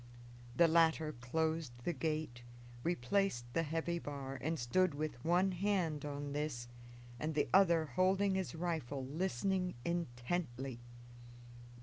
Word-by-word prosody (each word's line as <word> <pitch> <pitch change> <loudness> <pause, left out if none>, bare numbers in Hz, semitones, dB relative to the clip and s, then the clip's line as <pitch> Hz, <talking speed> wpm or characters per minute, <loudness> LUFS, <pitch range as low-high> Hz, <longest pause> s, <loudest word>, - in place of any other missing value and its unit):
The 170 - +6
latter 160 -1 +4
closed 155 +3 -1
the 175 - 0
gate, 155 -7 -2 0.4
replaced 165 -2 +1
the 165 - +2
heavy 165 +2 -1
bar, 135 -3 -5
and 160 +4 -1
stood 160 +6 +2
with 145 -5 -4
one 180 +3 +3
hand 180 -6 0
on 145 -1 -4
this 145 -5 -2 0.5
and 155 0 -2
the 145 -1 +2
other 170 -4 +6
holding 190 +4 +2
his 190 -3 -2
rifle, 155 -6 -2
listening 180 +5 -1
intently. 135 -4 -2
160 Hz, 120 wpm, -36 LUFS, 140-175 Hz, 0.5 s, The